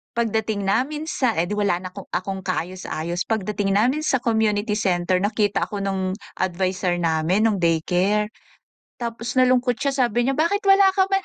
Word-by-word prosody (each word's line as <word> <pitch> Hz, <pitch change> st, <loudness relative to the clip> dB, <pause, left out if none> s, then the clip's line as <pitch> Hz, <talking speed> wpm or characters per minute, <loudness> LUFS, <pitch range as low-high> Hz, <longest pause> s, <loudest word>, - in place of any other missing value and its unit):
Pagdating 220 Hz, -3 st, -1 dB
namin 280 Hz, +9 st, 0 dB
sa 260 Hz, -10 st, 0 dB
eh, -, -, +3 dB
'di 210 Hz, -, -3 dB
wala 195 Hz, -4 st, +1 dB
na'ko 185 Hz, +1 st, -8 dB
akong 190 Hz, +1 st, -3 dB
kaayos-ayos, 175 Hz, -1 st, -3 dB
pagdating 205 Hz, -2 st, -1 dB
namin 250 Hz, +8 st, +2 dB
sa 265 Hz, -4 st, +1 dB
community 220 Hz, -2 st, +1 dB
center, 185 Hz, -2 st, +1 dB
nakita 205 Hz, 0 st, 0 dB
ako 200 Hz, -1 st, -4 dB
nung 190 Hz, -1 st, -1 dB, 0.2 s
adviser 185 Hz, 0 st, 0 dB
namin 165 Hz, +5 st, +1 dB
nung 205 Hz, -4 st, 0 dB
daycare. 180 Hz, +6 st, +1 dB, 0.7 s
Tapos 230 Hz, -1 st, -4 dB
nalungkot 255 Hz, -1 st, +4 dB
siya, 280 Hz, -1 st, -1 dB
sabi 240 Hz, +1 st, 0 dB
niya 270 Hz, -, +1 dB
bakit 370 Hz, +6 st, +1 dB
wala 390 Hz, 0 st, +6 dB
ka 380 Hz, -1 st, +3 dB
man 390 Hz, 0 st, +2 dB
205 Hz, 160 wpm, -22 LUFS, 185-240 Hz, 0.7 s, wala